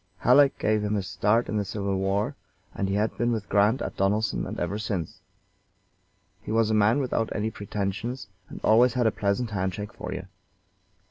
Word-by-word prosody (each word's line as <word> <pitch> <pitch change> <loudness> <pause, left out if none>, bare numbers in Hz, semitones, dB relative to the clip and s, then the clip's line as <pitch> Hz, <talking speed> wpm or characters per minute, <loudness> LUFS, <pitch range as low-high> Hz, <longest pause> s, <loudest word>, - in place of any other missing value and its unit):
Halleck 135 +3 +5
gave 110 0 +1
him 105 0 0
his 100 -2 -1
start 105 +6 +1
in 110 - -2
the 105 - +1
civil 100 0 -2
war, 100 +7 0 0.4
and 95 - -2
he 95 - 0
had 105 +2 0
been 120 0 +2
with 110 -3 -2
Grant 105 +6 +3
at - - -5
Donelson 105 +3 0
and - - -5
ever 90 +4 -2
since. 95 -7 -4 1.2
He - - -7
was 110 0 +2
a - - +2
man 110 +3 +4
without 125 -5 0
any 110 +1 -1
pretensions, 105 +4 -4 0.2
and - - -8
always 120 +2 +5
had 125 -1 +2
a 110 - +4
pleasant 105 +3 -1
hand 95 -2 -1
shake 105 +2 -6
for - - -7
you. 90 0 -5
105 Hz, 195 wpm, -26 LUFS, 100-115 Hz, 1.2 s, Halleck